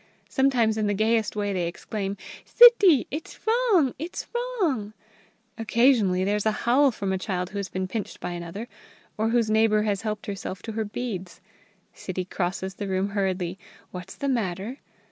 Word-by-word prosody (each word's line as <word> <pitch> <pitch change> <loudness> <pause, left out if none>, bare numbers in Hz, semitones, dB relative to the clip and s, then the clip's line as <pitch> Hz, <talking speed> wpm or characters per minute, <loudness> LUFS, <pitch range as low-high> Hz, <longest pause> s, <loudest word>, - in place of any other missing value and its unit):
Sometimes 245 -5 +2
in 215 - +1
the 205 - 0
gayest 220 +1 +1
way 205 -1 -1
they 180 -2 -1
exclaim: 195 +3 -4 0.3
"Sittie! 415 - +7
It's 305 +3 -6
wrong! 440 - +3
it's 330 +4 -5
wrong!" 370 - -1 0.7
Occasionally 225 -5 +3
there 200 +2 +1
is 210 - -1
a - - +4
howl 270 +4 +5
from 200 -5 -3
a 190 - -1
child 180 -2 -3
who 205 - -4
has 200 - -4
been 185 0 -3
pinched 210 +2 -5
by - - -4
another, 175 +6 -6 0.5
or 220 0 0
whose 230 -2 +2
neighbour 215 -1 +3
has 205 -3 -1
helped 215 -1 -4
herself 195 -2 -6
to 225 - -5
her 220 0 -2
beads. 205 -5 -5 0.5
Sittie 185 -1 -5
crosses 185 +1 -3
the 200 +1 -5
room 190 +1 0
hurriedly. 190 -2 -2 0.3
"What's 180 +1 -8
the 280 - -3
matter?" 220 0 -2
210 Hz, 170 wpm, -25 LUFS, 190-245 Hz, 0.7 s, Sittie